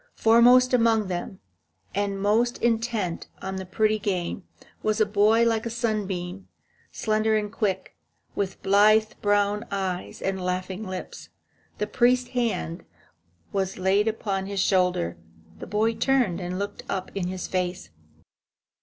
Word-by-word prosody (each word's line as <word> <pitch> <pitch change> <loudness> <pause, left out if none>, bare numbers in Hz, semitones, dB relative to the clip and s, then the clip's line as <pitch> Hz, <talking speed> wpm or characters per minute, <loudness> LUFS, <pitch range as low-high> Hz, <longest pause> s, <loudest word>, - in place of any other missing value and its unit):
Foremost 245 +3 +5
among 225 -4 +3
them, 180 +1 -5 0.5
and 200 -1 -1
most 225 +5 +2
intent 225 -6 -1
on 190 0 -5
the 190 -1 -6
pretty 215 +3 +1
game, 185 -2 -2 0.4
was 215 0 0
a 215 - +5
boy 210 +3 +4
like 225 -1 +1
a 235 - -3
sunbeam, 200 -5 -3 0.4
slender 215 0 +1
and 210 -1 -3
quick, 195 -4 -2 0.4
with 195 -1 -3
blithe 215 +2 +5
brown 205 +1 +2
eyes 190 -2 -3
and 190 -1 -2
laughing 185 +2 -3
lips. 185 -1 -7 0.5
The 210 - -1
priest's 245 +3 +2
hand 230 -8 -2 0.7
was 190 -1 -1
laid 195 +3 +2
upon 195 -3 -2
his 200 -1 -3
shoulder. 180 - +1 0.4
The - - -7
boy 215 +3 +1
turned 235 -8 +1
and 180 +1 -4
looked 200 +1 -4
up 190 -1 -3
in 190 -3 -2
his 185 0 -4
face. 180 - -3
205 Hz, 135 wpm, -25 LUFS, 185-220 Hz, 0.7 s, Foremost